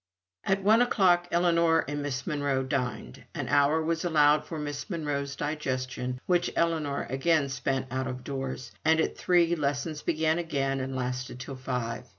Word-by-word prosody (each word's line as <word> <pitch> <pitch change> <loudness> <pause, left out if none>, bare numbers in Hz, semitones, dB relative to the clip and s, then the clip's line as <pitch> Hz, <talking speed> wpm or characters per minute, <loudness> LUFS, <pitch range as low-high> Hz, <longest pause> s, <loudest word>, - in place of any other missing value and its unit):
At 195 0 +1
one 220 +4 +5
o'clock, 180 -7 +3
Ellinor 170 -1 +3
and 145 0 -3
Miss 140 -2 -3
Monro 145 -4 0
dined. 125 - -3
An - - -3
hour 150 +3 +3
was 165 +1 -1
allowed 150 -3 +4
for 160 - -5
Miss 145 +2 -5
Monro's 145 -5 -2
digestion, 130 -4 -3
which 175 -1 +2
Ellinor 160 -4 0
again 140 +2 +1
spent 135 0 -1
out 130 0 -2
of 125 -1 -5
doors, 135 -2 -5
and 160 +1 +4
at - - 0
three, 175 -1 +3
lessons 150 +1 -2
began 160 +1 +1
again 135 -5 -1
and 130 0 -4
lasted 125 0 -3
till 135 +1 -6
five. 125 -3 -4
145 Hz, 165 wpm, -28 LUFS, 130-165 Hz, -, one